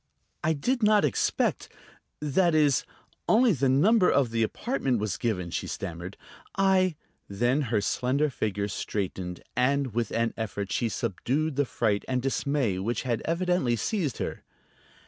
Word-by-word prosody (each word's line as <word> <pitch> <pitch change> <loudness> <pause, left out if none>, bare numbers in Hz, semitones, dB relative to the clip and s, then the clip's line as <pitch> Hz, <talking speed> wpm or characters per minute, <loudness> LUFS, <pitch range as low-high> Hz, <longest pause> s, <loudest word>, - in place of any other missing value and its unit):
"I 160 - +2
did 240 - -1
not 210 -4 +4
expect... 140 - 0 0.5
that 155 +3 +2
is, 145 -4 +3 0.4
only 230 0 +5
the 135 -3 +1
number 185 - +4
of 135 -5 +2
the 115 0 0
apartment 135 - 0
was 105 -1 -2
given," 90 -7 -2
she - - -3
stammered. 90 0 -6 0.4
"I 190 -3 +3 0.2
..." - - -45
Then 120 +8 +1
her 110 -3 +1
slender 135 +7 0
figure 100 -4 -2
straightened, 95 -3 -4
and 130 0 +1
with 115 -1 -1
an 115 0 0
effort 100 -3 -4
she 115 - 0
subdued 130 - -1
the 145 +1 +2
fright 105 -4 0
and 130 -1 0
dismay 135 -5 0
which 115 +5 -2
had 120 -4 -1
evidently 170 -7 +1
seized 155 - -1
her. - - -4
130 Hz, 150 wpm, -27 LUFS, 110-155 Hz, 0.5 s, only